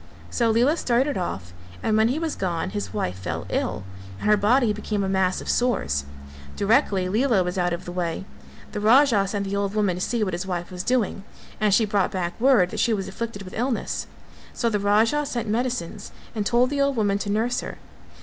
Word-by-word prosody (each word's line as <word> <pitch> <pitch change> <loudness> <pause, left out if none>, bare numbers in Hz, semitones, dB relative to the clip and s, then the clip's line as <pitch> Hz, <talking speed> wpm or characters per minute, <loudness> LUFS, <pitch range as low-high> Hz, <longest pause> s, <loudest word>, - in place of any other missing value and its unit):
So 235 -2 +2
Lela 245 +8 +3
started 260 +2 +1
off 95 - -4 0.3
and 215 - +2
when 220 +1 +4
he 255 +5 0
was 320 -1 -2
gone 170 - -2
his 100 -1 -4
wife 90 0 -3
fell 85 -2 -4
ill, 90 +1 -1 0.4
and - - -3
her 210 - +6
body 220 +3 +3
became 210 -1 -2
a - - -1
mass 190 -1 +1
of - - -9
sores. 70 - +1 0.5
Directly 200 -4 +2
Lela 220 0 +2
was 180 0 -3
out 175 0 +1
of 170 0 -4
the 175 - -6
way, 175 0 -3 0.5
the 210 - -3
Raja 220 -2 +5
sent 200 0 -2
the 195 +1 -2
old 200 0 -1
woman 205 -4 +2
to 180 - -5
see 235 +3 0
what 185 -3 -2
his 175 +2 -3
wife 175 -1 -3
was 180 -1 -4
doing 225 -4 0 0.4
and 215 -1 +2
she 220 +3 +4
brought 205 -2 +1
back 180 +2 -3
word 240 -9 +4
that - - -4
she 235 - +3
was 195 -2 -4
afflicted 210 0 -5
with 185 - -10
illness; 245 +1 -2 0.5
so 235 -2 0
the 210 - +1
Raja 220 +8 +3
sent 240 -6 -3
medicines 220 -4 -2 0.2
and 210 -3 -1
told 245 +3 +3
the 285 -1 0
old 280 -1 +2
woman 205 -3 +1
to 205 - -4
nurse 225 +4 +1
her. - - -6
205 Hz, 215 wpm, -24 LUFS, 185-235 Hz, 0.5 s, her